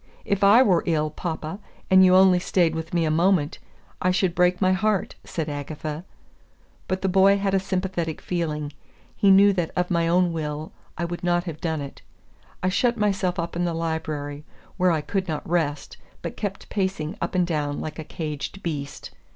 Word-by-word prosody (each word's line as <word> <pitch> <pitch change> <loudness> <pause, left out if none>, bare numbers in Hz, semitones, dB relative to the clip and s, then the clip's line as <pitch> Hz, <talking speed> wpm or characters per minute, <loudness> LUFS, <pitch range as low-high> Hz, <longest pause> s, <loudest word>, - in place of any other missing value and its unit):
"If 200 0 0
I 215 +6 +7
were 180 -8 +3
ill, 155 -2 +1
papa, 160 +2 -5 0.3
and 190 0 +8
you 185 0 +6
only 185 -1 +6
stayed 175 -2 +1
with 160 0 -5
me 170 -2 +1
a 155 - +1
moment, 165 -2 +2 0.4
I 185 - +2
should 185 -1 +1
break 180 0 +2
my 185 -1 +3
heart," 205 +1 0
said 160 -2 -4
Agatha. 150 +2 -5 0.8
But 190 0 -2
the - - +2
boy 195 +1 +5
had 195 -1 -1
a 195 - +4
sympathetic 185 -4 -2
feeling. 150 -4 -3 0.4
He 200 - +3
knew 200 +1 +7
that 175 -4 -1
of 180 0 0
my 170 -1 +2
own 175 0 +3
will 155 -1 -4 0.3
I 170 - -1
would 175 +1 -5
not 175 0 +2
have 165 -4 -7
done 160 -4 -1
it. 140 -1 -8 0.6
I - - +2
shut 235 +5 +1
myself 195 -3 0
up 170 -1 -3
in 175 - 0
the 170 -1 -1
library, 155 -3 -3 0.3
where 185 -1 +3
I 160 -3 +1
could 190 +4 -2
not 155 -3 -4
rest, 160 -4 -1 0.3
but - - -5
kept 200 -2 -5
pacing 190 -4 -2
up - - -2
and 180 -1 +3
down 150 -4 -2
like 155 0 -6
a - - -4
caged 155 +4 -6
beast. 145 -4 -5
175 Hz, 190 wpm, -24 LUFS, 155-190 Hz, 0.8 s, and